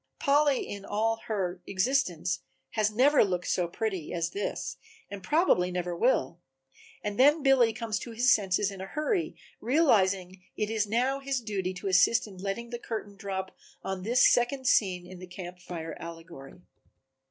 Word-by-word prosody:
Polly 285 Hz, -1 st, +2 dB
in 200 Hz, -1 st, -7 dB
all 220 Hz, +3 st, 0 dB
her 185 Hz, -4 st, -2 dB
existence 255 Hz, +9 st, 0 dB, 0.3 s
has 215 Hz, -1 st, +1 dB
never 265 Hz, +7 st, +4 dB
looked 180 Hz, -3 st, -2 dB
so 180 Hz, -2 st, +1 dB
pretty 185 Hz, -2 st, -3 dB
as 170 Hz, -1 st, -2 dB
this 135 Hz, -9 st, -4 dB, 0.3 s
and 200 Hz, -1 st, -6 dB
probably 300 Hz, -, +2 dB
never 180 Hz, -1 st, -3 dB
will, 175 Hz, -4 st, +1 dB, 0.6 s
and 205 Hz, +1 st, -4 dB
then 290 Hz, +3 st, +5 dB
Billy 265 Hz, -4 st, +5 dB
comes 220 Hz, -1 st, -3 dB
to -, -, -8 dB
his 240 Hz, +3 st, +4 dB
senses 195 Hz, -1 st, +1 dB
in 195 Hz, -1 st, -8 dB
a 190 Hz, -, -6 dB
hurry, 305 Hz, -, -1 dB, 0.2 s
realizing 200 Hz, -, +3 dB
that 190 Hz, -, -16 dB, 0.2 s
it 210 Hz, -, -2 dB
is 215 Hz, -2 st, 0 dB
now 250 Hz, +6 st, +1 dB
his 275 Hz, -1 st, -2 dB
duty 200 Hz, -5 st, -3 dB
to 185 Hz, -, -5 dB
assist 195 Hz, +5 st, +4 dB
in 200 Hz, -3 st, -12 dB
letting 200 Hz, +5 st, -4 dB
the 240 Hz, -, -4 dB
curtain 215 Hz, -4 st, -6 dB
drop 195 Hz, -2 st, -5 dB, 0.3 s
on 190 Hz, -1 st, -4 dB
this 235 Hz, +6 st, +4 dB
second 260 Hz, +2 st, +1 dB
scene 185 Hz, -7 st, +2 dB
in 180 Hz, 0 st, -11 dB
the 185 Hz, -, -9 dB
Camp 180 Hz, 0 st, -9 dB
Fire 165 Hz, -2 st, -6 dB
allegory. 165 Hz, -3 st, -10 dB
205 Hz, 170 wpm, -28 LUFS, 185-240 Hz, 0.6 s, then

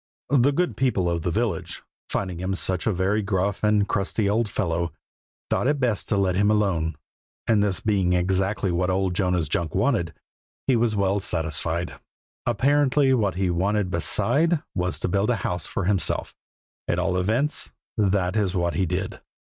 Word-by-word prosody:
The 140 Hz, 0 st, +5 dB
good 175 Hz, +5 st, 0 dB
people 120 Hz, -9 st, +1 dB
of 85 Hz, -1 st, 0 dB
the 90 Hz, -, -1 dB
village, 110 Hz, +4 st, -2 dB, 0.3 s
finding 90 Hz, -3 st, -2 dB
him 95 Hz, +1 st, -2 dB
such 95 Hz, 0 st, 0 dB
a -, -, +3 dB
very 95 Hz, +3 st, +1 dB
gruff 100 Hz, 0 st, -1 dB
and 105 Hz, -1 st, +3 dB
crusty 100 Hz, +1 st, 0 dB
old 105 Hz, +2 st, +1 dB
fellow, 85 Hz, -4 st, -1 dB, 0.6 s
thought -, -, +1 dB
it 145 Hz, 0 st, +1 dB
best 120 Hz, -6 st, 0 dB
to 105 Hz, -, +2 dB
let 95 Hz, -2 st, +2 dB
him 100 Hz, +3 st, +2 dB
alone; 95 Hz, -7 st, +1 dB, 0.5 s
and 110 Hz, -2 st, +3 dB
this 100 Hz, -3 st, +1 dB
being 95 Hz, -4 st, +1 dB
exactly 95 Hz, +2 st, +1 dB
what 90 Hz, +2 st, 0 dB
old 95 Hz, 0 st, +1 dB
Jonas 90 Hz, -3 st, 0 dB
Junk 80 Hz, +1 st, -1 dB
wanted, 95 Hz, -6 st, +1 dB, 0.5 s
he 130 Hz, -, +3 dB
was 115 Hz, -2 st, +1 dB
well 100 Hz, 0 st, +1 dB
satisfied. 80 Hz, 0 st, -2 dB, 0.5 s
Apparently 135 Hz, +3 st, +3 dB
what 105 Hz, -8 st, +1 dB
he 95 Hz, -1 st, 0 dB
wanted 95 Hz, +2 st, 0 dB
beside 145 Hz, -, +1 dB
was 90 Hz, 0 st, -2 dB
to -, -, 0 dB
build 100 Hz, +4 st, +1 dB
a 125 Hz, -, +3 dB
house 90 Hz, -2 st, -2 dB
for 115 Hz, -, -3 dB
himself: 95 Hz, 0 st, 0 dB, 0.5 s
at 85 Hz, -, 0 dB
all 90 Hz, 0 st, 0 dB
events, 110 Hz, +11 st, 0 dB, 0.2 s
that 95 Hz, -3 st, +1 dB
is 100 Hz, -3 st, 0 dB
what 85 Hz, -1 st, 0 dB
he 95 Hz, -, 0 dB
did. 95 Hz, +3 st, -3 dB
95 Hz, 175 wpm, -24 LUFS, 90-110 Hz, 0.6 s, The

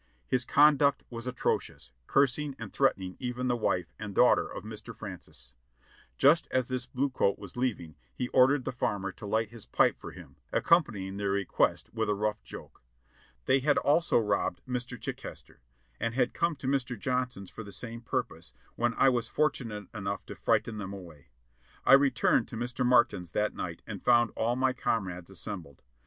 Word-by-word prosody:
His 130 Hz, -1 st, +1 dB
conduct 145 Hz, 0 st, +4 dB
was 115 Hz, +1 st, -6 dB
atrocious, 125 Hz, -, -2 dB, 0.2 s
cursing 140 Hz, +1 st, +2 dB
and -, -, -8 dB
threatening 95 Hz, -9 st, +1 dB
even 125 Hz, 0 st, -3 dB
the 120 Hz, -, +2 dB
wife 90 Hz, -6 st, -1 dB
and 105 Hz, -2 st, -6 dB
daughter -, -, +5 dB
of -, -, -7 dB
Mr. -, -, -8 dB
Francis. -, -, -9 dB, 0.6 s
Just 155 Hz, +5 st, +5 dB
as 130 Hz, -1 st, 0 dB
this 130 Hz, 0 st, -2 dB
blue 135 Hz, +1 st, -1 dB
coat 100 Hz, -6 st, +1 dB
was 100 Hz, -3 st, -10 dB
leaving 120 Hz, -11 st, -2 dB, 0.2 s
he 125 Hz, -, -3 dB
ordered 130 Hz, +1 st, +4 dB
the -, -, -1 dB
farmer 100 Hz, -6 st, -2 dB
to 105 Hz, -, -10 dB
light 110 Hz, +1 st, 0 dB
his 115 Hz, -3 st, -11 dB
pipe -, -, +3 dB
for -, -, -8 dB
him, -, -, -13 dB
accompanying 105 Hz, -, +2 dB
the 100 Hz, -1 st, -1 dB
request 100 Hz, -1 st, 0 dB
with 110 Hz, -2 st, -1 dB
a 105 Hz, -, +2 dB
rough 105 Hz, +1 st, -1 dB
joke. -, -, -11 dB, 0.6 s
They 135 Hz, -, +4 dB
had 145 Hz, +2 st, +2 dB
also 165 Hz, +4 st, +3 dB
robbed 105 Hz, -5 st, 0 dB
Mr. 125 Hz, 0 st, -4 dB
Chichester, -, -, -8 dB, 0.4 s
and 115 Hz, 0 st, -2 dB
had 125 Hz, -1 st, +1 dB
come 170 Hz, -1 st, 0 dB
to 140 Hz, -2 st, -7 dB
Mr. 130 Hz, -3 st, 0 dB
Johnson's 125 Hz, -4 st, -2 dB
for -, -, -8 dB
the 100 Hz, -, -10 dB
same 115 Hz, +2 st, -6 dB
purpose, 120 Hz, -, -4 dB, 0.2 s
when 120 Hz, -1 st, 0 dB
I 135 Hz, -, +5 dB
was 120 Hz, -2 st, 0 dB
fortunate 115 Hz, -9 st, -1 dB
enough 100 Hz, -2 st, -4 dB
to -, -, -7 dB
frighten 110 Hz, -2 st, 0 dB
them 100 Hz, -1 st, -5 dB
away. 85 Hz, -7 st, -11 dB, 0.6 s
I -, -, +7 dB
returned 135 Hz, -4 st, +4 dB
to 115 Hz, -, -7 dB
Mr. 125 Hz, +2 st, -2 dB
Martin's 120 Hz, -9 st, +3 dB
that 105 Hz, 0 st, 0 dB
night 85 Hz, -2 st, -6 dB
and 100 Hz, -4 st, -7 dB
found 120 Hz, -2 st, +4 dB
all 115 Hz, +2 st, 0 dB
my 130 Hz, 0 st, +2 dB
com 115 Hz, -4 st, 0 dB
rades 90 Hz, 0 st, -8 dB
assembled. 90 Hz, -7 st, -7 dB
120 Hz, 180 wpm, -29 LUFS, 100-130 Hz, 0.6 s, I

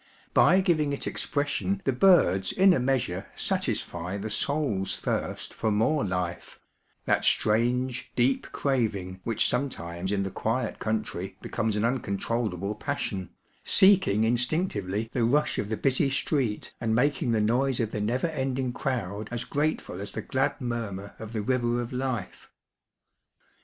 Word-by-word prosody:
By 190 Hz, -, +6 dB
giving 155 Hz, -6 st, +1 dB
it 140 Hz, -, -4 dB
expression 145 Hz, +7 st, -1 dB
the 135 Hz, -, +2 dB
birds 120 Hz, -, +4 dB
in 190 Hz, 0 st, +5 dB
a 165 Hz, -, +2 dB
measure 125 Hz, -8 st, -1 dB
satisfy 90 Hz, +3 st, -1 dB
the 105 Hz, +2 st, -5 dB
soul's 140 Hz, -11 st, 0 dB
thirst -, -, -3 dB
for 110 Hz, -, -1 dB
more 115 Hz, +9 st, +2 dB
life 90 Hz, -3 st, -3 dB, 0.5 s
ŌĆö -, -, +4 dB
^that -, -, -10 dB
strange, 120 Hz, +3 st, +1 dB
deep 130 Hz, +2 st, +1 dB
craving 100 Hz, -9 st, -1 dB
which 115 Hz, -, +2 dB
sometimes 95 Hz, -9 st, -2 dB
in 100 Hz, -1 st, +1 dB
the 95 Hz, -, -4 dB
quiet 115 Hz, +3 st, -2 dB
country 100 Hz, -4 st, -3 dB
becomes 110 Hz, -2 st, -2 dB
an 105 Hz, +2 st, +1 dB
uncontrollable 105 Hz, -4 st, -1 dB
passion, 95 Hz, -3 st, -3 dB, 0.3 s
seeking 190 Hz, -, +5 dB
instinctively 115 Hz, -, 0 dB
the -, -, -1 dB
ruidi 130 Hz, +6 st, +2 dB
of 105 Hz, -, -2 dB
the 110 Hz, -, -1 dB
busy 135 Hz, +3 st, +2 dB
street 130 Hz, -5 st, -1 dB
and 110 Hz, -1 st, +1 dB
making 135 Hz, 0 st, +1 dB
the 110 Hz, -, +2 dB
noise 125 Hz, +4 st, +1 dB
of 110 Hz, -3 st, -1 dB
the 105 Hz, -, -3 dB
never 120 Hz, +7 st, 0 dB
ending 135 Hz, -5 st, -1 dB
crowd 110 Hz, -7 st, -3 dB
as 120 Hz, -1 st, -3 dB
grateful 145 Hz, -, -2 dB
as 100 Hz, -, -5 dB
the -, -, -5 dB
glad 135 Hz, 0 st, 0 dB
murmur 110 Hz, -5 st, -4 dB
of 110 Hz, -1 st, -7 dB
the 110 Hz, -3 st, -3 dB
river 120 Hz, 0 st, +1 dB
of 120 Hz, +1 st, -4 dB
life. 125 Hz, -6 st, -4 dB
115 Hz, 150 wpm, -27 LUFS, 100-135 Hz, 0.5 s, By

